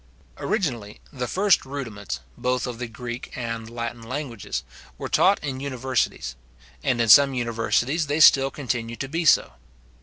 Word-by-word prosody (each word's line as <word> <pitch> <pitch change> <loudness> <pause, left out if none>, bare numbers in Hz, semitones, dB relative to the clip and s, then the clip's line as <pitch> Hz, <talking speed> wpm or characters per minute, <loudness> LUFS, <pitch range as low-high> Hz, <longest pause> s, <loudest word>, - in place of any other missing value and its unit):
Originally, 120 - -2
the 125 -2 -3
first 195 +2 +3
rudiments, 115 - -6
both 125 0 -1
of 120 -2 -6
the 125 - -3
Greek 120 +2 -7
and 115 -2 -4
Latin 115 0 -5
languages, 120 -2 -5 0.3
were - - -5
taught 195 +2 +4
in 135 -3 -3
universities; 130 - -2 0.5
and 130 -4 +1
in 115 - +2
some 135 +4 +7
universities 120 +6 0
they 145 +2 0
still 135 -3 +7
continue 120 -4 -3
to 135 - -5
be 165 +4 -2
so. 140 - +4
125 Hz, 150 wpm, -24 LUFS, 115-140 Hz, 0.5 s, some